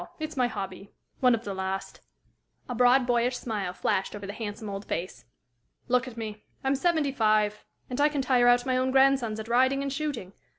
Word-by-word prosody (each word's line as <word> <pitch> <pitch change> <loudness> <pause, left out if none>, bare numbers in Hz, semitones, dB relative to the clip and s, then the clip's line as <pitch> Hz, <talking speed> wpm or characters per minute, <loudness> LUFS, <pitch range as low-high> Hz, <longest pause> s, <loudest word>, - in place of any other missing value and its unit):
It's 310 0 -5
my 250 -2 +2
hobby 195 -3 -6 0.3
one 250 -2 +5
of 230 - -7
the 200 - -4
last." 190 0 -4 0.7
A 245 - -3
broad, 250 +2 +4
boyish 245 +1 +1
smile 210 -7 -3
flashed 190 +2 -1
over 205 -1 -7
the 200 - -6
handsome 215 0 -6
old 200 0 -5
face. 165 -8 -4 0.6
"Look 250 +1 +2
at 240 -2 -9
me; 215 -2 -6 0.2
I'm 270 0 +2
seventy 305 0 +1
five, 215 -4 +2 0.2
and 250 +2 -2
I 295 - +5
can 290 -2 -1
tire 250 -2 +4
out 245 +1 +5
my 255 -1 +1
own 255 +1 +1
grandsons 265 -4 +3
at 220 - -6
riding 260 +3 +3
and 275 -1 -3
shooting. 275 -10 -4
245 Hz, 200 wpm, -27 LUFS, 210-265 Hz, 0.7 s, one